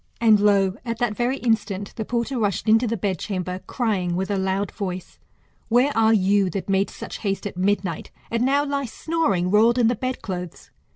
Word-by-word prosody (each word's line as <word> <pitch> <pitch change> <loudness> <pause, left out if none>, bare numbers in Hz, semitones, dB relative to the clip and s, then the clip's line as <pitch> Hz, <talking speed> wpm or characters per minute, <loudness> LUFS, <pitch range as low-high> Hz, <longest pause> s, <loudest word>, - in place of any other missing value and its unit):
And, 220 -3 +5
lo! 200 -1 +3
at 230 -2 -3
that 225 -3 -1
very 245 +4 0
instant 210 -5 -1
the 220 - -4
porter 240 +3 -2
rushed 205 -1 -1
into 225 +3 +4
the 230 +1 -1
bed 190 -3 -2
chamber, 185 -2 -3
crying, 195 -8 -1
with 190 +3 -2
a - - +1
loud 190 0 -1
voice. 185 -3 -6 0.5
Where 250 +5 +3
are 225 0 +4
you, 200 -2 +3
that 195 0 -4
made 195 0 +1
such - - -8
haste 195 -2 -2
at 205 - -5
midnight, 185 -2 -1 0.2
and 230 +1 +1
now 280 +3 +2
lie 280 -1 -1
snoring, 225 - -1
rolled 225 +4 +4
in 235 -2 +4
the 245 - +1
bed 255 +3 -4
clothes 180 -3 -6
210 Hz, 195 wpm, -23 LUFS, 190-235 Hz, 0.5 s, And